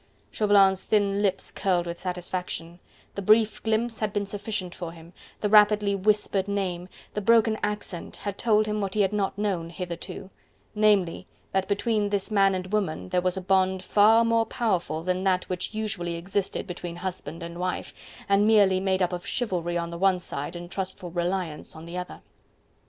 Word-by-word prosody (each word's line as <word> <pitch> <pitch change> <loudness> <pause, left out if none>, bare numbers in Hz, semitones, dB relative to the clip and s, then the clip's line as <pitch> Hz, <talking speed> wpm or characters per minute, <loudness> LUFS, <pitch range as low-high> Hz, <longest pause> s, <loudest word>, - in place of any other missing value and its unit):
Chauvelin's 200 -3 +4
thin 205 -1 +2
lips 195 -2 0
curled 180 -3 0
with 170 0 -5
satisfaction, 180 -1 -4 0.3
the 200 - -4
brief 215 +2 +4
glimpse 225 +1 0
had 215 -2 -1
been 205 0 -1
sufficient 200 -2 -4
for 170 -2 -6
him, 165 +1 -14 0.3
the 210 - +1
rapidly 210 -1 +5
whispered 200 -1 +1
name, 185 -3 -2 0.2
the 210 - -2
broken 225 +1 +4
accent 210 -4 -4
had 200 -1 -5
told 215 -1 +3
him 210 0 -2
what 195 0 -3
he 210 - +3
had 195 0 +1
not 200 -1 -1
known 190 -5 -1
hitherto: 175 +2 -7 0.4
namely, 205 -5 +2 0.2
that 190 0 0
between 210 0 0
this 200 +1 -1
man 195 -2 +4
and 185 +2 -5
woman 160 - -1
there 180 - +1
was 185 +1 0
a - - -2
bond 190 0 +2
far 220 +3 +5
more 230 -1 +2
powerful 180 - -1
that 185 +1 -1
that 185 -1 +2
which 185 +4 -4
usually 200 -6 -2
existed 190 +3 -2
between 175 -2 -6
husband 175 -2 -5
and 170 +1 -7
wife, 185 0 -3 0.3
and 200 +1 +4
merely 200 -4 +5
made 190 -1 +1
up 180 - 0
of 175 0 -5
chivalry 175 -8 -1
on 170 0 -3
the 170 - -6
one 190 -1 +4
side 165 -1 -5
and 175 0 -8
trustful 185 -2 -4
reliance 175 -3 -3
on 160 +1 -10
the 170 +1 -8
other. 180 0 -6
190 Hz, 180 wpm, -26 LUFS, 175-210 Hz, 0.4 s, rapidly